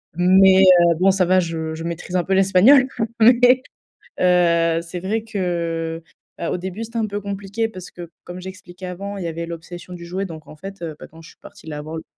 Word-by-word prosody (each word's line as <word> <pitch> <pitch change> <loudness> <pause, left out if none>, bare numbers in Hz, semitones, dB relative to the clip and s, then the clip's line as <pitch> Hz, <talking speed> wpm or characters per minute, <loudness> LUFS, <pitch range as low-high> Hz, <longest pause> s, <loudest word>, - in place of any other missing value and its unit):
Mais 190 +2 +5
heu, 175 -3 +6
bon 195 +1 +5
ça 190 -1 +1
va, 185 +1 +3
je 160 -2 -3
je 165 - -7
maîtrise 170 +2 -5
un 180 - +2
peu 190 - -1
l'espagnol 195 +8 +5 0.3
mais 245 +2 +5 0.6
heu, 170 -2 +3
c'est 170 +1 -7
vrai 215 +5 -2
que 170 -5 -3 0.4
bah, 170 - -3
au - - -1
début, 190 +5 -6
c'était 230 +1 -9
un 220 - 0
peu 205 0 -4
compliqué. 200 +3 -3
Parce 185 -4 -10
que 175 -2 -10
comme 180 +1 -8
j'expliquais 185 0 -10
avant, 200 +3 -6
il 180 - -5
y - - -2
avait 165 0 -4
l'obsession 170 +1 -9
du 170 -1 -9
jouet 190 +3 -3
donc 160 -4 -9
en 155 - -13
fait, 195 +3 -10
heu, 160 -2 -5
bah - - -10
quand 165 +1 -16
je 165 - -14
suis - - -22
partie - - -15
la 150 -2 -6
voir 155 +2 -7
le 160 - -7
180 Hz, 225 wpm, -21 LUFS, 170-195 Hz, 0.6 s, heu